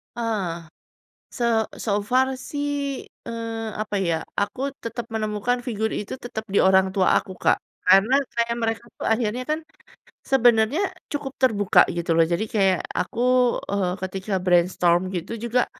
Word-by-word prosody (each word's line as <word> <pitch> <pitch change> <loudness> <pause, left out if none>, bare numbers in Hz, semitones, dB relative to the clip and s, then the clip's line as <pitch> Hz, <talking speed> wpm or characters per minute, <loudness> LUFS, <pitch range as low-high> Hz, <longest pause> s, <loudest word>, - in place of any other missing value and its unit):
Eh. 225 -5 -1 0.8
Se 240 - -3 0.3
so 205 -2 0
far 255 +5 +3 0.2
sih, 290 0 -2 0.6
eee, 230 -1 -4
apa 215 - -6
ya, 170 - +1 0.3
aku 205 +5 -2 0.2
tetap 230 0 -4
menemukan 220 +3 -1
figur 220 -2 -1
itu 210 +5 -5
tetap 220 -2 -4
di - - +5
orang 190 0 +4
tua 190 -1 +3
aku, 195 - -7
Kak, - - +3 0.3
karena 205 +7 +6 0.2
kayak 235 0 +1
mereka 225 +1 -1
tuh - - -3
akhirnya 225 +2 0
kan. 305 - +1 0.7
Sebenarnya 240 - +4 0.3
cukup 285 -2 -4
terbuka 210 -6 +3 0.2
gitu 170 -1 0
loh, 165 - +4
jadi 170 +5 +1
kayak 195 -4 +3 0.2
aku, 205 - -6 0.5
eee, 195 -3 0
ketika 190 +2 -4
brainstorm 180 0 +2
gitu 175 +6 -4
juga, 235 +1 +1
220 Hz, 145 wpm, -24 LUFS, 190-235 Hz, 0.8 s, karena